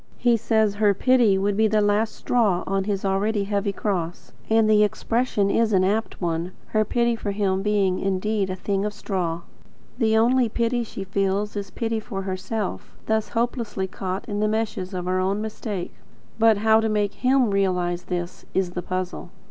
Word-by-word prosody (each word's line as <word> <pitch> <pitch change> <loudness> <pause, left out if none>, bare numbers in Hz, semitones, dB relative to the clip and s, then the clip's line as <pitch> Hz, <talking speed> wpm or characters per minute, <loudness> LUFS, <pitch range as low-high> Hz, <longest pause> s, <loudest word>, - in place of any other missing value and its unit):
He 240 -1 +3
says 220 -2 +2
her 205 -2 +4
pity 240 -3 +4
would 200 +1 0
be 220 +1 +3
the 215 0 +2
last 210 +1 +1
straw 215 -8 +1
on 195 0 -1
his 200 -1 -2
already 200 +2 +1
heavy 200 0 -1
cross; 180 -4 -3 0.2
and 220 0 +4
the 210 -1 +5
expression 210 -1 0
is 225 0 +2
an 185 -1 +4
apt 210 +4 -1
one, 170 0 -2 0.2
her 215 0 +2
pity 235 +2 +1
for 220 - -4
him 195 -2 0
being 200 -3 +1
indeed 195 +1 0
a 185 - -2
thing 195 +1 -1
of 210 0 -2
straw. 170 -4 -2 0.6
The 220 -2 +3
only 240 +1 +3
pity 235 +2 0
she 205 -3 -7
feels 195 +2 -1
is 200 -1 -4
pity 225 -1 -2
for 200 -3 -5
herself, 190 +2 -4
thus 220 -1 0
hopelessly 230 -4 -1
caught 190 +1 -5
in 205 -2 -3
the 215 - +2
meshes 210 -3 -2
of 180 -1 -3
her 185 +1 0
own 195 +2 0
mistake. 215 -3 -5 0.5
But 225 -1 +5
how 220 +1 +4
to 225 0 0
make 210 -1 0
him 255 -3 +2
realise 180 -3 0
this, 175 -1 -4
is 190 -2 +1
the 180 - -4
puzzle. 185 0 -4
205 Hz, 185 wpm, -24 LUFS, 190-220 Hz, 0.6 s, the